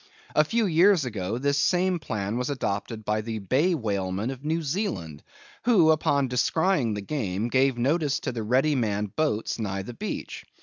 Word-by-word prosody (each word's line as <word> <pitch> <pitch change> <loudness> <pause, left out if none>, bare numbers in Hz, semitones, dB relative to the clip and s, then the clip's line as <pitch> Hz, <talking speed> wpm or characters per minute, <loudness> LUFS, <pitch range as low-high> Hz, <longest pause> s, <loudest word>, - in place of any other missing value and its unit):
A 150 - +6
few 225 +8 0
years 175 -2 +4
ago 105 -2 -3
this 140 +2 +1
same 180 +2 +2
plan 105 -7 -3
was 125 +2 -2
adopted 110 -4 -3
by 105 0 0
the 110 0 -4
Bay 135 - +1
whalemen 100 - -2
of 135 0 -9
New 160 +2 -1
Zealand, 110 - -3 0.4
who, 185 -10 +5
upon 140 -3 +2
descrying 125 - +1
the 105 - -4
game, 105 -3 -2
gave 130 0 +2
notice 145 +3 +1
to 130 - -2
the 115 -2 -4
ready 130 +7 +2
manned 105 -5 -1
boats 145 -8 -1
nigh 100 -3 -3
the 120 - -8
beach. 210 - -5
125 Hz, 175 wpm, -26 LUFS, 105-155 Hz, 0.4 s, A